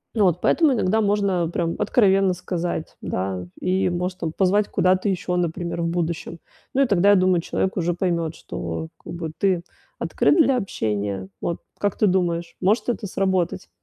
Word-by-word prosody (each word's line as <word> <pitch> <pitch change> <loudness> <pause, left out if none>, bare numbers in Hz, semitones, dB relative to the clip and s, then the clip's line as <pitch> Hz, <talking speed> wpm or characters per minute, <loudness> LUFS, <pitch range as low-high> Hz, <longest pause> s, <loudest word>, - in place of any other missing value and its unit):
Ну 210 -3 +4
вот 180 -1 +2
поэтому 315 -5 +4
иногда 220 -1 +2
можно, 200 -5 +1
прям, 170 -1 -1
откровенно 195 -4 +3
сказать, 175 -2 -4
да, 95 -1 -3
и, 185 0 +1
может, 180 +1 -3
там, 160 -2 -2
позвать 200 +3 +2
куда-то 185 +2 +2
ещё, 180 -1 -1
например, 170 0 -2
в 170 - 0
будущем. 170 -1 -2 0.4
Ну, 275 - +4
и - - +3
тогда, 200 -1 +4
я 205 - +7
думаю, 185 -2 +3
человек 190 +3 -1
уже 175 -1 0
поймёт, 170 -3 -1
что, 80 -2 -5
как - - -8
бы, 165 -2 -5
ты 185 -3 +1 0.3
открыт - - +2
для 275 -5 +4
общения. 100 - -2
Вот, 170 - -2 0.2
как 205 -2 0
ты 215 - +3
думаешь, 175 -3 0
может 210 +7 +2
это 230 -4 -2
сработать? 185 - -1
180 Hz, 175 wpm, -23 LUFS, 170-195 Hz, 0.4 s, я